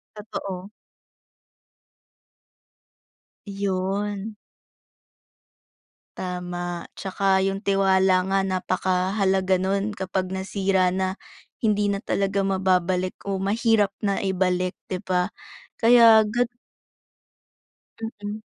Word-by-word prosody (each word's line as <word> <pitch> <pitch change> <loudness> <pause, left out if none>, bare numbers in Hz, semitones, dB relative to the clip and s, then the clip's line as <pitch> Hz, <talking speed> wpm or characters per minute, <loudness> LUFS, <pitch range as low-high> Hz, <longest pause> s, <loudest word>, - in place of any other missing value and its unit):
Totoo. 195 -3 -6 2.8
Yun. 200 +1 -2 1.8
Tama, 175 -1 -4
tsaka 190 0 +1
yung 195 0 -1
tiwala 190 -2 +3
nga 195 - +3
napakahalaga 190 0 +1
nun 195 +3 0
kapag 190 -2 -3
nasira 190 0 +1
na, 185 +1 -1 0.4
hindi 210 -2 +1
na 200 - -1
talaga 195 -1 -1
mababalik 185 -1 +1
o 195 - 0
mahirap 210 +1 +2
na 200 -1 -1
ibalik 185 -1 0
'di 185 +1 -4
ba, 180 -2 +1 0.5
kaya 230 -2 +7
gat 235 +3 0 1.8
Mm. 210 +1 -5
195 Hz, 80 wpm, -24 LUFS, 185-200 Hz, 2.8 s, kaya